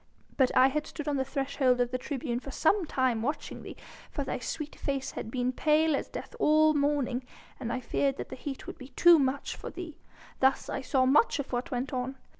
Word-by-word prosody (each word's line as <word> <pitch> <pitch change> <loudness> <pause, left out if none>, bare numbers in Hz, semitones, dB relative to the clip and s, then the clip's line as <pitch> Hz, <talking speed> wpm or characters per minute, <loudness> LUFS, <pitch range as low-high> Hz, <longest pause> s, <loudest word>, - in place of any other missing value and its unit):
But 260 -2 +4
I 260 +1 +7
had 300 +2 -2
stood 300 -1 -7
on 290 -1 +1
the 265 - +1
threshold 270 -2 +1
of 245 0 +1
the 255 - -1
tribune 250 -3 -3
for 275 - -9
some 340 +6 +2
time 255 -5 +1
watching 290 +5 -3
thee, - - -9 0.3
for 285 - -3
thy 270 - -3
sweet 295 +5 -5
face 275 -2 -3
had 220 - -6
been 250 +1 0
pale 310 +3 +3
as - - -3
death - - -7
all 310 0 +5
the 295 - +1
morning, 280 -3 0 0.4
and 235 -3 -3
I 255 - -2
feared 275 +1 0
that - - -6
the - - -6
heat 270 0 -6
would - - -8
be 255 - -9
too 340 +4 +6
much 275 0 -1
for - - -7
thee. 340 -4 -8 0.4
Thus 265 0 +2
I - - -2
saw 260 0 +2
much 290 - +4
of 285 -2 -4
what 245 +6 -1
went 255 0 -3
on. 255 +1 -3
270 Hz, 225 wpm, -29 LUFS, 255-295 Hz, 0.4 s, I